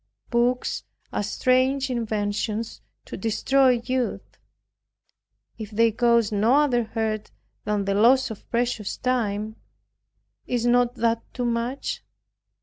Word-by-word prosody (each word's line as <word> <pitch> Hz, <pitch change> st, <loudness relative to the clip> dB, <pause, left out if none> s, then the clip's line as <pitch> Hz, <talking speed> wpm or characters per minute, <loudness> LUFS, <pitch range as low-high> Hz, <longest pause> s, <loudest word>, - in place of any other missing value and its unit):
Books 245 Hz, +1 st, +1 dB, 0.3 s
are -, -, 0 dB
strange 255 Hz, +5 st, +1 dB
inventions 215 Hz, -1 st, -2 dB, 0.2 s
to -, -, -7 dB
destroy 245 Hz, +4 st, +2 dB
youth. 255 Hz, -1 st, -2 dB, 1.2 s
If 215 Hz, -2 st, -6 dB
they 225 Hz, +1 st, +3 dB
caused 235 Hz, -1 st, +2 dB
no 220 Hz, +5 st, +3 dB
other 260 Hz, -6 st, +3 dB
hurt 220 Hz, -1 st, -3 dB, 0.4 s
than 210 Hz, -1 st, 0 dB
the 200 Hz, -, 0 dB
loss 250 Hz, +5 st, +4 dB
of 220 Hz, -, -11 dB
precious 235 Hz, -3 st, -1 dB
time, 220 Hz, -4 st, -1 dB, 0.9 s
is 240 Hz, -1 st, -1 dB
not 245 Hz, 0 st, +3 dB
that 230 Hz, -1 st, +1 dB
too 245 Hz, -, -2 dB
much? 235 Hz, +3 st, -2 dB
235 Hz, 115 wpm, -24 LUFS, 215-250 Hz, 1.2 s, loss